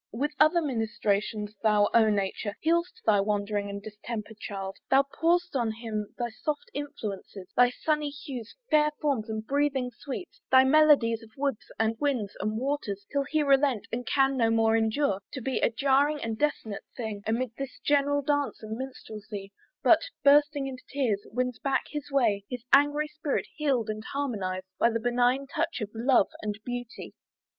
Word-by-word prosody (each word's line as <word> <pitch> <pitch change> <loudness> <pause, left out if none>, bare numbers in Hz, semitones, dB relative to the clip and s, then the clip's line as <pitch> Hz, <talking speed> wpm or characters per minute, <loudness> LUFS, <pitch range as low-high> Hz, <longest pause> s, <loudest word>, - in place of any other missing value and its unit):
With 280 +7 -1
other 320 +3 +5
ministrations 215 -4 -1
thou, 210 -2 +4
O 225 -2 +6
nature! 205 0 -1
Healest 340 +7 0
thy 205 - +5
wandering 205 0 -1
and 200 0 -5
distempered 215 0 -7
child: 195 -2 -5
Thou 270 +1 +6
pourest 340 +4 0
on 235 -4 +1
him 220 -2 -4
thy 240 -1 -2
soft 300 - -4
influences, 205 -9 -6
Thy 245 0 +6
sunny 300 +3 -1
hues, 270 -5 -8 0.2
fair 300 0 +5
forms, 265 -7 0
and 220 0 -4
breathing 275 -1 0
sweets, 295 +8 -7
Thy 260 0 +7
melodies 265 -5 +5
of 225 - -14
woods, 275 -5 -2
and 225 +1 0
winds, 255 -9 -1
and 215 +2 -1
waters, 230 -7 -2
Till 280 0 0
he 305 +1 +1
relent, 275 -5 +3
and 245 +1 -2
can 270 +1 +2
no 230 -3 +3
more 225 0 +3
endure 220 -2 +1
To 265 - -4
be 260 +2 -1
a - - +3
jarring 280 +4 +2
and 225 - -2
a 300 +7 +3
dissonant 220 -8 -7
thing, 220 -4 -4
Amid 235 +2 0
this 275 -1 -5
general 285 0 +2
dance 285 -3 0
and 220 0 -4
minstrelsy; 215 -6 -7 0.3
But, - - +7 0.2
bursting 290 0 +5
into 260 -1 -6
tears, 245 -8 0
wins 250 +1 -1
back 275 -1 0
his 295 -1 -5
way, 230 -8 +2
His 245 -2 -5
angry 290 +2 +5
spirit 300 -1 -2
healed 270 -7 +1
and 215 0 -4
harmonized 200 -10 -2
By 235 - +5
the 230 0 -1
benignant 245 +3 +1
touch 330 0 -1
of 210 -2 -4
love 235 -2 +3
and 210 -1 -4
beauty. 245 -1 -6
245 Hz, 170 wpm, -28 LUFS, 215-285 Hz, 0.3 s, Thy